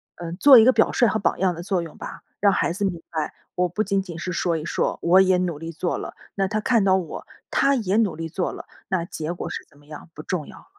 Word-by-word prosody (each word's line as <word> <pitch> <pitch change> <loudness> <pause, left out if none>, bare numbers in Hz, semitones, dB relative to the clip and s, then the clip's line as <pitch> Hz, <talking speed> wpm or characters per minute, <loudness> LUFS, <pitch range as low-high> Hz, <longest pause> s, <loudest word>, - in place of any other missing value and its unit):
嗯， 170 -1 -6
做 275 +3 +8
一 220 - +6
个 255 - +6
表 - - +3
率 240 - +3
和 220 - +1
榜 200 - 0
样 185 -1 +1
的 170 - -7
作 185 -1 0
用 165 -2 -9
吧。 - - -8 0.2
让 200 0 +4
孩 175 - 0
子 200 +3 -4
明 175 -4 -2
白 155 -2 -3 0.2
我 180 0 +1
不 210 +5 -1
仅 195 0 +1
仅 175 -4 -8
是 180 - -4
说 170 -1 0
一 155 - -6
说， - - -1
我 180 +3 +5
也 185 -1 +4
努 180 -4 -1
力 165 +2 -7
做 170 +2 -2
了。 - - -6 0.2
那 195 -1 +1
他 215 +2 -1
看 225 0 +2
到 190 -1 +4
我， 180 -4 -6 0.2
他 275 0 +3
也 205 -6 0
努 215 -6 +2
力 165 0 -4
做 175 +3 -2
了， - - -9 0.2
那 180 -3 0
结 160 -1 -5
果 175 - -6
是 - - -5
怎 - - -24
么 145 - -22
样 150 +2 -11
不 155 - -8
重 155 -1 -3
要 - - -12
了。 - - -17
180 Hz, 300 characters per minute, -23 LUFS, 165-200 Hz, 0.2 s, 做